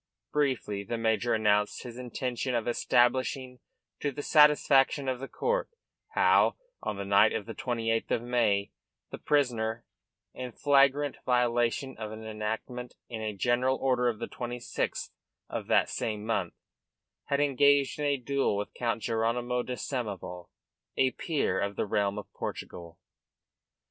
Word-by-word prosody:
Briefly 130 -9 0
the 115 +4 -3
major 115 +1 +1
announced 105 -1 +1
his 120 0 -8
intention 125 0 -3
of 115 0 -1
establishing 125 +1 +1 0.4
to 145 - -1
the 145 +2 -6
satisfaction 145 -2 +5
of 130 -1 -1
the 135 - -5
court - - -1 0.5
how, - - +4 0.3
on 100 - -3
the 100 - -4
night 100 +2 +5
of 100 - -2
the 115 - -6
28th 115 -3 -1
of 115 - 0
May, 115 -5 +1 0.4
the - - -6
prisoner, 120 -5 0 0.5
in 125 -2 -6
flagrant 140 +1 +3
violation 125 +1 +1
of 110 -1 -5
an 110 0 -8
enactment 110 +3 -4
in 115 -2 -5
a 110 -1 -3
general 125 +4 +2
order 125 -2 +1
of 115 - -3
the - - -5
26th 120 -1 -4 0.4
of - - -4
that - - +4
same 105 -1 -3
month, 100 -6 -1 0.7
had 140 - 0
engaged 140 0 +3
in 150 - -1
a 140 -1 +2
duel 135 -4 0
with 105 - -4
Count 115 -2 -2
Jeronymo 120 +2 0
de 125 - -4
Samoval, 100 -10 -5 0.5
a 130 -1 +3
peer 140 - -1
of 100 0 -2
the - - -1
realm 100 -1 0
of - - -5
Portugal. 85 -1 -7
120 Hz, 150 wpm, -29 LUFS, 110-130 Hz, 0.7 s, satisfaction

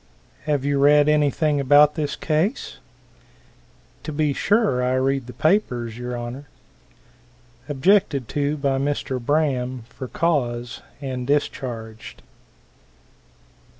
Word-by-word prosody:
"Have 145 -3 0
you 140 -1 +1
read 145 +1 +5
anything 150 0 +2
about 145 +2 +5
this 150 -3 -3
case?" 160 - -1 1.2
"To 155 - -6
be 150 -1 0
sure, 200 - +1
I 125 +1 +1
read 135 -1 0
the 125 - -9
papers, 125 - 0
y'r 125 +1 -5
Honor." 120 +4 -6 1.2
Objected 145 - +2
to 145 +1 -1
by 140 -2 0
Mr. 135 -3 -2
Braham, 130 -4 0
for 130 - -8
cause, 120 -7 -1 0.2
and 130 -3 -4
discharged. 115 - -3
140 Hz, 110 wpm, -22 LUFS, 125-150 Hz, 1.2 s, read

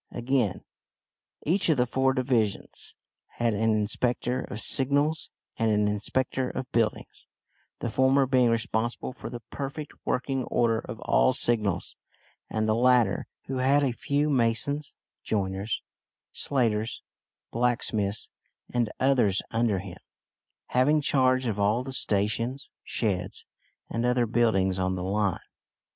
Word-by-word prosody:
Again, 120 -5 0 0.8
each 180 +4 +2
of 155 - +4
the 125 - +3
four 130 +2 +1
divisions 120 -6 -1 0.4
had 120 -1 +1
an 110 +2 +1
inspector 120 +4 0
of 105 - -6
signals 145 +6 +1 0.3
and 115 0 +2
an 105 -1 +2
inspector 125 +5 -1
of 130 - -5
buildings, 115 -2 -1 0.5
the 120 - -1
former 130 +2 +4
being 125 -2 +3
responsible 115 +2 -1
for - - -8
the 120 -1 -7
perfect 140 +2 -5
working 130 +1 -1
order 115 -2 +1
of 110 - -8
all 130 - +3
signals, 110 -7 0 0.5
and 110 0 -1
the 110 - +3
latter, 120 -3 +3 0.2
who 135 - -3
had 135 +3 +3
a 130 -3 +1
few 145 +4 0
masons, 130 +4 +1 0.3
joiners, 100 0 -2 0.5
slaters, 115 -5 -1 0.5
blacksmiths, 115 -4 0 0.4
and 120 -3 +1
others 125 -8 +3
under 115 -3 +1
him, 95 -1 -7 0.7
having 145 +5 +3
charge 130 -2 +2
of 105 -4 -1
all 105 +5 +2
the 135 0 -6
stations, 115 +5 -1
sheds, 95 -4 -2 0.4
and 115 - -2
other 125 0 +2
buildings 105 -5 +2
on 95 0 0
the 90 - -4
line. 100 0 0
120 Hz, 130 wpm, -27 LUFS, 105-130 Hz, 0.8 s, of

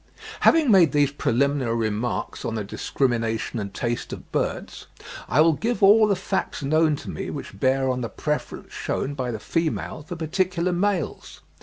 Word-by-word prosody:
Having 315 -7 +5
made 175 -8 +6
these 145 -2 +3
preliminary 140 -2 0
remarks 110 +1 -2
on 115 - -3
the 110 - -2
discrimination 115 +1 -1
and 100 -1 -4
taste 120 +3 -3
of - - -9
birds, - - -3 0.4
I 150 - +4
will 165 +1 +5
give 230 +6 -2
all 215 +2 +7
the 200 - +2
facts 190 -4 -3
known 155 +2 +3
to - - -9
me - - -5
which 100 - -7
bear 130 +3 +2
on 125 -1 0
the 115 - -3
preference 150 0 -4
shewn 140 - -2
by 130 -3 -3
the 115 - -3
female 165 +3 -2
for 175 +4 -7
particular 175 +2 0
males. 180 -3 -2
145 Hz, 170 wpm, -24 LUFS, 120-175 Hz, 0.4 s, all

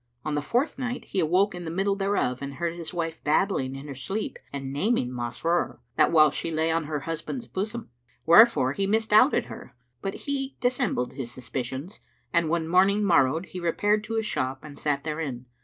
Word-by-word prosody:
On 155 - -1
the 145 - 0
fourth 255 - 0
night, 250 -1 -3
he 195 - -2
awoke 180 +5 +3
in 175 0 -6
the 165 - -4
middle 195 +4 0
thereof 195 -11 0
and 140 0 -5
heard 170 +1 -2
his 170 -2 -6
wife 165 -2 -4
babbling 150 -4 +1
in 135 +2 -8
her 140 - -5
sleep 135 - -4
and 135 -1 -5
naming 145 - +1
Masrur, 125 +8 -1 0.2
what - - +3
while 155 -3 +6
she 165 - -3
lay 160 0 +1
on 165 -1 0
her 150 -1 -3
husband's 165 - -5
bosom, 215 - -4 0.3
wherefore 170 - +6
he 195 +5 -1
misdoubted 220 +5 +4
her; - - -11 0.3
but 195 - -5
he 275 -1 -3
dissembled 245 - 0
his 130 -3 -6
suspicions 130 - -5 0.3
and 170 -2 +2
when 165 -1 0
morning 195 +4 +4
morrowed 165 -2 +3
he 180 - -6
repaired 205 +5 +1
to 225 +1 -4
his 220 -1 0
shop 130 -8 -2
and 150 -2 -10
sat 140 -2 0
therein. 150 -6 -4
165 Hz, 190 wpm, -26 LUFS, 140-205 Hz, 0.3 s, while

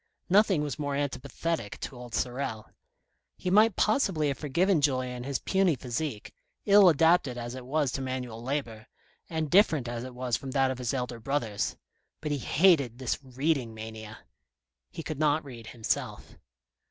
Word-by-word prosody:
Nothing 190 -4 +4
was 145 0 -4
more 145 -1 -2
anti 145 -1 -1
pathetic 140 -3 -4
to - - -5
old 120 -1 -7
Sorel. 125 -3 -2 0.7
He 180 - -2
might 215 +1 +5
possibly 190 - +2
have 135 - -2
forgiven 170 +4 +2
Julien 130 -3 0
his 140 -1 -1
puny 190 - +2
physique, 125 -1 -4 0.3
ill 200 -2 +7
adapted 160 -5 +3
as 120 0 -5
it 130 -1 -8
was 145 -1 +1
to 135 - -3
manual 125 -3 -4
labour, 120 -4 -4 0.4
and 160 -3 -2
different 160 - +4
as 120 0 -4
it 130 -1 -8
was 125 -2 -1
from 135 - -8
that 135 -1 +3
of 130 - -5
his 125 -3 -1
elder 125 -2 -3
brothers; 115 -4 -2 0.4
but 150 -1 -4
he 145 - 0
hated 140 - +3
this 130 -1 -2
reading 130 -2 -1
mania. 110 0 -8 0.7
He 165 - -7
could 155 -1 -5
not 150 0 +2
read 120 -5 -10
himself. 115 -2 -3
135 Hz, 165 wpm, -28 LUFS, 120-155 Hz, 0.7 s, ill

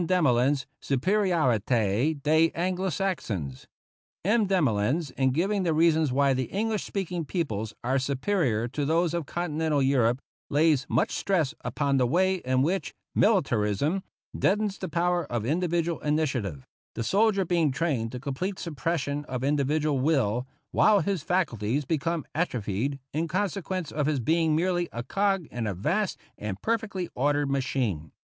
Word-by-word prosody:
Demolins's 140 -6 +2
" - - -60
Supe 135 0 -2
riorite 130 - +2
des 160 +3 +4
Anglo 185 +2 -1
Saxons." 110 - -3 0.6
M. 215 +1 +3
Demolins, 145 - +1
in 130 0 +1
giving 190 +9 +1
the 165 -4 +1
reasons 160 -3 +3
why 140 +1 +3
the 130 0 -1
English 215 +1 -1
speaking 180 -3 -3
peo 170 +3 -1
ples 110 -6 -5
are 130 +3 +1
superior 135 - 0
to 145 +4 -3
those 165 +3 +1
of 170 -4 -2
Continental 160 -3 -1
Europe, 130 -3 +2 0.3
lays 150 -2 +3
much - - +1
stress 165 -8 0
upon 140 -2 0
the 125 -2 +3
way 185 +7 +2
in 130 -5 +1
which 185 +6 -1
" - - -62
militar 155 - +3
ism 150 - 0 0.2
" - - -12
deadens 205 0 +1
the - - -4
power 175 +2 +1
of 115 -3 -1
individual 170 +2 0
initiative, 135 - -1 0.3
the 115 - -2
soldier 200 - +2
being 170 -3 +2
trained 130 -6 -1
to 125 - -5
complete 145 +9 -3
suppression 145 -1 -2
of 130 -2 -4
individual 145 +1 +1
will, 130 -4 +1 0.2
while 210 -2 +4
his 195 -5 -1
faculties 140 - 0
become 165 +2 -1
atrophied 130 - -1 0.2
in 160 +3 0
consequence 185 -1 -2
of 150 -1 -1
his 150 -3 +1
being 160 +5 +2
merely 175 +1 0
a 120 - -5
cog 195 +5 0
in 120 -2 -3
a 100 - -2
vast 175 - 0 0.2
and 100 -2 -4
perfectly 215 -5 -1
ordered 145 +1 +1
machine. 120 - -1
150 Hz, 155 wpm, -27 LUFS, 130-180 Hz, 0.6 s, des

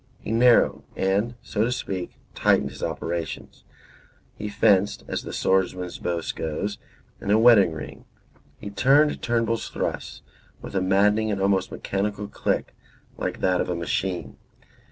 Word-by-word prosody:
He - - -6
narrowed, 120 +1 +4
and, 100 +5 0
so 105 - -1
to 120 - 0
speak, 95 -7 -4 0.2
tightened 70 - +2
his 65 - -11
operations: 85 -2 -4 0.7
he 105 - -5
fenced 100 -1 +2
(as - - -3
the - - -8
swordsman's 90 -1 0
boast 85 -2 -3
goes), 90 +6 -3 0.4
in - - -5
a 105 - +5
wedding 110 -6 +6
ring; 80 -1 -8 0.5
he 100 - -8
turned 140 +8 +3
Turnbull's 115 -1 0
thrusts - - -4 0.4
with - - -9
a 95 - +2
maddening 105 +3 +3
and 100 -2 -1
almost 95 -1 +1
mechanical 105 +1 -3
click, - - -2 0.5
like - - -3
that 90 -1 +2
of - - -3
a 90 - -1
machine. 90 +2 -3
100 Hz, 145 wpm, -24 LUFS, 90-110 Hz, 0.7 s, wedding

